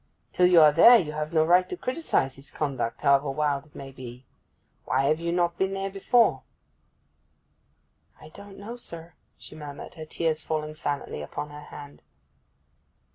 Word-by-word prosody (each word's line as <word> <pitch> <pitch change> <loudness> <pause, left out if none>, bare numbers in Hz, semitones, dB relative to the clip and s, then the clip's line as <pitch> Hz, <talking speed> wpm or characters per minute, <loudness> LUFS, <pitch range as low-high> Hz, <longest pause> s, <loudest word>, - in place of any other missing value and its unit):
Till 180 - +4
you 180 -2 +6
are 150 -1 +7
there 230 +11 +8
you 160 -8 -2
have 150 +1 -4
no 160 -1 +3
right 180 +2 +4
to 365 - -5
criticize 255 - -1
his 135 0 -10
conduct, 130 -6 -3
however 140 0 +3
wild 145 0 -1
it 150 - -27
may 135 -1 -9
be. 125 -1 -11 0.6
Why 130 +1 +1
have 155 +3 +1
you 170 0 -2
not 175 -1 0
been 190 0 0
there 195 0 -3
before?' 200 - +2 1.8
'I 155 - -13
don't 200 +3 -13
know, 225 +5 -8
sir,' 170 -7 -10 0.2
she - - -12
murmured, 145 -2 -9
her 160 - -9
tears 160 0 -2
falling 155 -1 -3
silently 145 - -4
upon 145 - -6
her 150 0 -10
hand. 145 -1 -12
155 Hz, 170 wpm, -26 LUFS, 140-180 Hz, 1.8 s, there